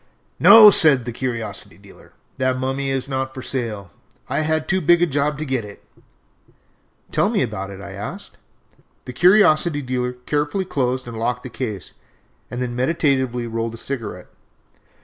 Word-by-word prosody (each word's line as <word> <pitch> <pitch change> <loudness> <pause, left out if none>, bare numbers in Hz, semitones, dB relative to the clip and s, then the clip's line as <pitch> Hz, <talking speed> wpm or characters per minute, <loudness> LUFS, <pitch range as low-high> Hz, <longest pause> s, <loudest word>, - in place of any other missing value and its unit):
"No," 215 -2 +9
said 140 -10 +5
the 120 - -4
curiosity 115 -4 -5
dealer, - - -18 0.3
"that 130 0 0
mummy 135 +1 -2
is 135 -1 -2
not 130 0 -4
for 130 - -7
sale. 110 -8 -4 0.4
I - - -1
had 155 0 -1
too 190 -1 +1
big 175 +2 +4
a - - +5
job 145 -1 -1
to 155 - -4
get 130 -4 -2
it." 105 -1 -12 1.3
"Tell - - +1
me - - +1
about 95 +1 -5
it," 100 0 -10
I - - -9
asked. - - -8 0.7
The 125 - -8
curiosity 170 - +3
dealer 125 -1 -2
carefully 150 +8 -2
closed 130 -5 -2
and 115 -2 -7
locked 125 +2 -2
the 130 - -7
case, 110 -7 -6 0.6
and 125 - -6
then 120 -1 -5
meditatively 130 -3 0
rolled 115 0 -4
a - - -10
cigarette. 115 -8 -6
130 Hz, 165 wpm, -20 LUFS, 120-150 Hz, 1.3 s, No